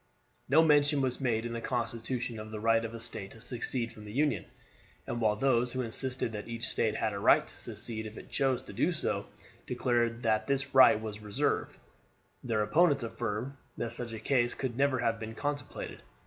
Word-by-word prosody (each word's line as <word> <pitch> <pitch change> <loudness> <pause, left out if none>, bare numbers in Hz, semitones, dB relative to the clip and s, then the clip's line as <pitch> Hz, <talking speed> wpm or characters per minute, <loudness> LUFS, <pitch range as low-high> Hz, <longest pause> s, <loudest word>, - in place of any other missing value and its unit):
No 155 +4 +6
mention 145 -1 +4
was 130 0 -1
made 115 -3 +1
in 120 - -3
the 115 - -3
constitution 120 -1 -2
of 110 0 -7
the 110 -1 -5
right 115 +1 +3
of 115 0 -5
a - - -6
State 100 -4 -4
to 115 - -14
secede 120 0 -2
from 105 - -12
the 105 - -8
Union, 135 - +1 0.6
and 120 0 -3
while 105 -1 +3
those 125 0 +2
who 130 0 -1
insisted 125 +1 -2
that 105 -2 -6
each 115 +1 -4
State 110 -1 +1
had 110 -1 0
a 100 - -3
right - - +5
to - - -13
secede 110 -1 -5
if 110 - -10
it - - -11
chose 135 -2 +1
to - - -10
do - - +2
so - - -2 0.4
declared 120 -1 0
that 110 -1 +2
this 135 0 -1
right 130 -5 +8
was 110 -1 -6
reserved, 105 -1 -1 0.7
their 110 -4 +1
opponents 145 +1 +4
affirmed 115 +3 -3 0.2
that 115 0 -3
such 120 0 -5
a 110 - -5
case 120 +1 +1
could 130 -4 -3
never 140 0 +2
have 115 -2 0
been 110 0 -6
contemplated. 145 +2 -4
115 Hz, 205 wpm, -31 LUFS, 110-130 Hz, 0.7 s, right